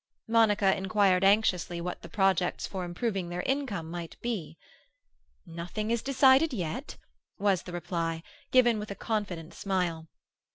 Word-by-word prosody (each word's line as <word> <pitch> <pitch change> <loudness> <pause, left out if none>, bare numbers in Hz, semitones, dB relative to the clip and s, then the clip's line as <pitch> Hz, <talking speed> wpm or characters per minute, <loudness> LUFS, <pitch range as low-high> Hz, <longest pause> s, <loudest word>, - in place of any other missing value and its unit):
Monica 210 -4 +4
inquired 195 -1 +2
anxiously 195 -4 +3
what 180 +1 -5
the 170 - -10
projects 190 -1 +1
for 190 -2 -5
improving 180 +1 -2
their 175 +1 -3
income 260 - -2
might 170 -1 -7
be. 185 -10 -4 0.9
"Nothing 175 +6 -4
is 235 -1 +1
decided 275 +3 +5
yet," 185 - -4 0.4
was 195 -3 +2
the 180 - -9
reply, 165 -2 -3 0.3
given 240 -4 +5
with 210 - -6
a 200 - -5
confident 195 -8 -3
smile. 180 -5 -2
195 Hz, 135 wpm, -29 LUFS, 175-220 Hz, 0.9 s, decided